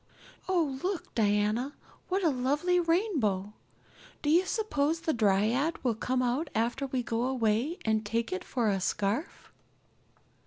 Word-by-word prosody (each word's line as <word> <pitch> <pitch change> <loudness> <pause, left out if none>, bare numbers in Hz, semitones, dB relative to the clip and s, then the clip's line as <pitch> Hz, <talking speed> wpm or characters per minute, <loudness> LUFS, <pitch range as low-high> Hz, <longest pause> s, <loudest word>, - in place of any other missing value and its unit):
Oh, 315 -8 +1
look, 375 -1 -3
Diana, 215 +5 +1 0.4
what 380 +1 0
a 325 - +4
lovely 290 +8 +1
rainbow! 305 - 0 0.7
Do 295 - +2
you 355 +4 +4
suppose 330 -8 0
the 320 -2 0
dryad 225 +8 +2
will 245 -3 +2
come 255 +3 -1
out 255 +6 0
after 240 +5 0
we 255 -2 -2
go 230 -1 -1
away 250 - 0
and 220 -1 +1
take 225 0 -1
it 185 - -3
for 240 -4 -1
a 195 -2 +1
scarf?" 205 - -2
255 Hz, 145 wpm, -29 LUFS, 220-320 Hz, 0.7 s, a